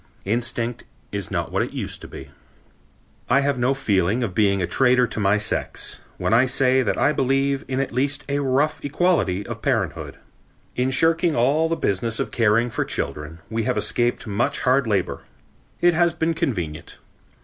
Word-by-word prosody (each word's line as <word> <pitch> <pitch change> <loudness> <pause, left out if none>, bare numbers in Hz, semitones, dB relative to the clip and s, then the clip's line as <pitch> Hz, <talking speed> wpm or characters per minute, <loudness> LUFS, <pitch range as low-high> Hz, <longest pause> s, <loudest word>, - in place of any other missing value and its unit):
Instinct 120 +2 -2 0.3
is 100 -3 -4
not - - -3
what - - 0
it - - -3
used - - -5
to - - -9
be. - - -11 1.0
I 140 - +4
have 140 -2 0
no 130 +3 +2
feeling 105 -2 +1
of 105 -6 -3
being 100 -1 +2
a 90 - 0
traitor 125 +7 +3
to 115 - -3
my 100 0 +3
sex, 105 - -2 0.2
when - - 0
I 125 +3 +5
say 130 0 +3
that - - -1
I 150 - +3
believe 135 +1 +1
in 130 0 -2
at 135 - -2
least 140 +2 0
a 140 0 -1
rough 140 +2 0
equality 145 - +1
of - - -7
parenthood. - - -2 0.6
In 125 +1 +1
shirking 165 +4 +2
all 145 +7 +2
the 165 - +1
business 110 - -1
of - - -2
caring 115 +1 +2
for - - -1
children 75 +3 -3
we 115 -1 -2
have 125 - 0
escaped 120 0 0
much 105 +1 -1
hard 130 0 +2
labor. 100 -4 -1 0.6
It 175 0 +5
has 170 0 +2
been 165 0 0
convenient. 90 - -4
125 Hz, 180 wpm, -22 LUFS, 105-140 Hz, 1.0 s, I